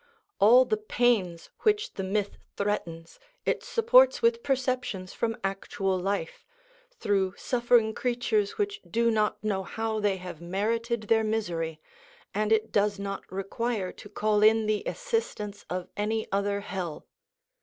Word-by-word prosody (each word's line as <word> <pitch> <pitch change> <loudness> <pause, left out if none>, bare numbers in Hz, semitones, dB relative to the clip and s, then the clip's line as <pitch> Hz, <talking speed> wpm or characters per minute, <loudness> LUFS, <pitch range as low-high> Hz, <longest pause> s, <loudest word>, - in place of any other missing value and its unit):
All 245 +5 +7
the 220 -3 0
pains 210 -6 0
which 425 -1 +1
the - - -4
myth 200 +1 -2 0.2
threatens 170 - -3 0.3
it - - 0
supports - - +5
with 465 0 +2
perceptions 250 - -1
from 225 -1 -2
actual 195 0 -1
life, 185 -2 -2 0.5
through 200 - 0
suffering 240 -3 +2
creatures 235 -5 0
which 415 0 -2
do 235 0 +2
not 215 -1 0
know 200 -3 0
how 220 +3 -3
they 205 -2 +1
have 180 -3 -8
merited 225 +6 -1
their 220 +1 +3
misery, 170 -8 -2 0.5
and 215 +1 0
it 220 0 +2
does 205 0 +2
not 195 -1 -6
require 195 +1 -2
to 205 - -13
call 210 0 +1
in 220 +1 +5
the 215 -1 +1
assistance 455 - -3
of 180 0 -3
any 220 +2 -1
other 200 +1 0
hell. 180 -6 -5
215 Hz, 140 wpm, -28 LUFS, 195-235 Hz, 0.5 s, All